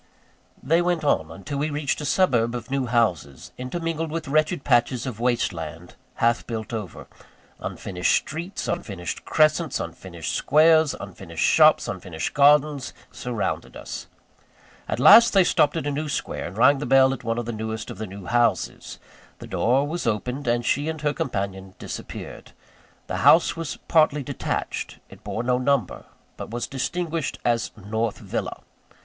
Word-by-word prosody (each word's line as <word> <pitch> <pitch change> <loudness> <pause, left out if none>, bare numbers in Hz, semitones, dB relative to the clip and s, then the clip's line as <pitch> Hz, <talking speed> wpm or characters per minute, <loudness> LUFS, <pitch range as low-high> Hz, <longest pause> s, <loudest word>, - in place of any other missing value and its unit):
They 165 +6 +3
went 175 -2 0
on, 80 - +1
until 95 - -6
we 150 +2 0
reached 145 0 -2
a - - -4
suburb 125 -9 +2
of 120 +2 -7
new 135 -2 0
houses, 90 - -1
intermingled 165 +4 -3
with 160 0 -4
wretched 155 +1 +1
patches 120 -1 +2
of 120 -5 -5
waste 120 -4 +1
land, 80 +1 -8 0.2
half 115 0 +1
built 115 -1 -5
over. 105 -7 -6 0.5
Unfinished 90 -2 -1
streets, 170 +6 -4
unfinished 95 - -4
crescents, 155 0 +2
unfinished - - -6
squares, 155 0 +4
unfinished - - -6
shops, - - +5
unfinished 80 -3 -4
gardens, 145 -1 +3 0.2
surrounded 120 -4 -4
us. - - -7 0.8
At - - -2
last 230 0 +8
they 195 -2 +6
stopped 150 -2 +2
at 160 - -3
a 145 - -1
new 150 +2 -3
square, - - -3
and 90 +4 -10
rang 135 +4 +5
the 145 - -4
bell 135 +1 +5
at 135 - -8
one 115 0 -1
of 120 - -2
the 120 - -3
newest 110 0 -5
of - - -10
the 110 - -4
new 95 0 -10
houses. 120 +2 0 0.4
The - - -10
door 135 +4 +1
was 165 -3 -3
opened, 125 +6 -2
and 120 0 +1
she 145 +5 +1
and 160 -1 -4
her 150 -1 +1
companion 95 -6 -4
disappeared. - - -8 0.5
The - - -4
house 165 - +5
was 165 -2 -5
partly 155 -3 +3
detached. 140 -1 -4
It - - -15
bore 115 - -3
no 125 0 +1
number; 130 -6 0 0.3
but - - -7
was 120 +2 -3
distinguished 160 +4 -3
as 120 -1 +1
North 110 +2 -2
Villa. - - -5
130 Hz, 165 wpm, -24 LUFS, 115-150 Hz, 0.8 s, last